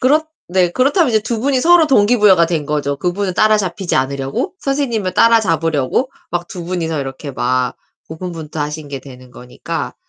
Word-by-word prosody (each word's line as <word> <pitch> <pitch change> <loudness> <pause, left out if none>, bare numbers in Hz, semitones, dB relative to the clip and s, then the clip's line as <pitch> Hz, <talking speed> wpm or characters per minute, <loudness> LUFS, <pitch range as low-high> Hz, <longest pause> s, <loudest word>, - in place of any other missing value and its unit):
그렇 300 +5 +3 0.2
네, 180 -1 +2
그렇다면 280 +3 +2
이제 220 -1 +3
2 225 +1 -3
분이 265 0 +1
서로 345 0 +5
동기부여가 210 - +4
된 160 -4 -2
거죠. 145 -2 -1
그분은 180 +4 -2
따라잡히지 205 -4 +1
않으려고 135 - -2
선생님을 240 -9 -1
따라잡으려고 165 - +2 0.2
막 175 0 -3
2 175 -2 -7
분이서 165 -3 -2
이렇게 135 +1 -6
막 125 0 -1 0.3
고군분투하신 155 -3 -5
게 140 -1 -5
되는 130 -2 -14
거니까 125 +7 -6
175 Hz, 375 characters per minute, -17 LUFS, 145-225 Hz, 0.3 s, 서로